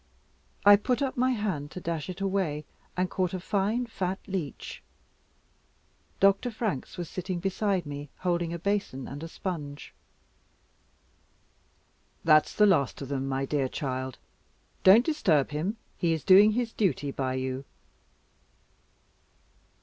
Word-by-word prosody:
I 205 0 +9
put 250 +6 0
up 265 - -2
my 255 +1 +2
hand 190 -11 -2
to 185 - -7
dash 165 -2 -3
it 185 +1 -6
away, 185 -7 -1 0.3
and 185 0 +2
caught 185 0 -1
a - - -3
fine 205 +6 0
fat 190 -5 -3
leech. 185 -8 -5 1.4
Dr. 195 +5 +4
Franks 215 - -3
was 175 -2 -4
sitting 185 +1 -4
by 195 0 0
me, 145 0 -6
holding 175 -2 -1
a 170 - -3
basin 185 -8 -2
and 140 +2 -7
a 165 - -5
sponge. 155 -5 -6 2.3
"That's 155 -2 +4
the 210 - +6
last 165 -10 +2
of 135 - -8
them, 135 -1 -2
my 135 0 -1
dear 135 -2 0
child. 130 -2 -4 0.7
Don't 205 +6 +8
disturb 170 - +2
him. 170 +9 -2 0.2
He 170 -2 +1
is 160 - -3
doing 205 +3 +7
his 235 0 -1
duty 145 - 0
by 130 -1 -2
you." 130 +1 -3
180 Hz, 135 wpm, -28 LUFS, 145-200 Hz, 2.3 s, I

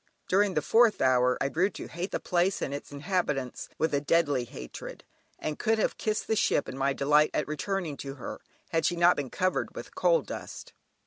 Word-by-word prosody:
During 195 0 +2
the 150 - +1
fourth 230 +3 +4
hour 125 -1 +3
I 140 - 0
grew 180 +7 +2
to - - -8
hate 175 +3 -4
the - - -2
place 180 +2 +1
and 140 - -3
its 145 - -6
inhabitants 145 -4 -2
with 160 -1 0
a 140 - +2
deadly 145 -4 +2
hatred, 60 - -9 0.3
and 155 -1 -4
could 225 0 +2
have 220 - 0
kissed 215 0 -1
the 220 - 0
ship 175 - +2
in 130 - -6
my 135 +1 +1
delight 150 +2 +3
at 150 - 0
returning 155 +1 -3
to 135 0 -6
her, 130 - -7 0.3
had 165 - +1
she 175 - +2
not 175 +1 +5
been 140 -3 -3
covered 185 +5 -1
with - - -8
coal - - +3
dust. - - -8
155 Hz, 205 wpm, -28 LUFS, 140-185 Hz, 0.3 s, not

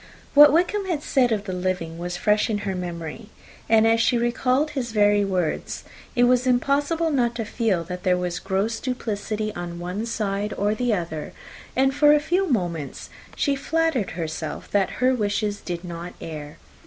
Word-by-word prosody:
What 295 0 +9
Wickham 365 +6 +1
had 320 -5 -2
said 255 -4 +2
of 210 -2 0
the 190 -3 -5
living 180 -3 -2
was 175 0 -4
fresh 210 +4 +2
in 215 - 0
her 195 - -1
memory; 175 +3 -6 0.4
and 225 0 +5
as 230 0 +4
she 245 - +3
recalled 255 +5 +1
his 250 -6 -3
very 205 -1 +4
words, 185 -5 -2 0.3
it 245 - +4
was 250 +1 +3
impossible 285 +6 +1
not 240 -4 +1
to 230 -2 -3
feel 205 -6 0
that 180 +2 -6
there 180 0 +2
was 180 -1 -2
gross 200 +4 -1
duplicity 215 -4 -3
on 175 -2 -6
one 180 +6 -4
side 205 -2 -2
or 205 +1 +1
the 245 +2 0
other, 170 -6 -3 0.4
and, 270 +1 +3
for 295 +1 +6
a - - +4
few 355 +6 0
moments, 175 - -2 0.2
she 280 - +1
flattered 320 -5 0
herself 160 -2 -5
that 200 -2 +2 0.2
her 260 - +5
wishes 205 -2 -1
did 175 -1 -5
not 170 0 -7
err. 150 -2 -7
210 Hz, 180 wpm, -24 LUFS, 180-255 Hz, 0.4 s, What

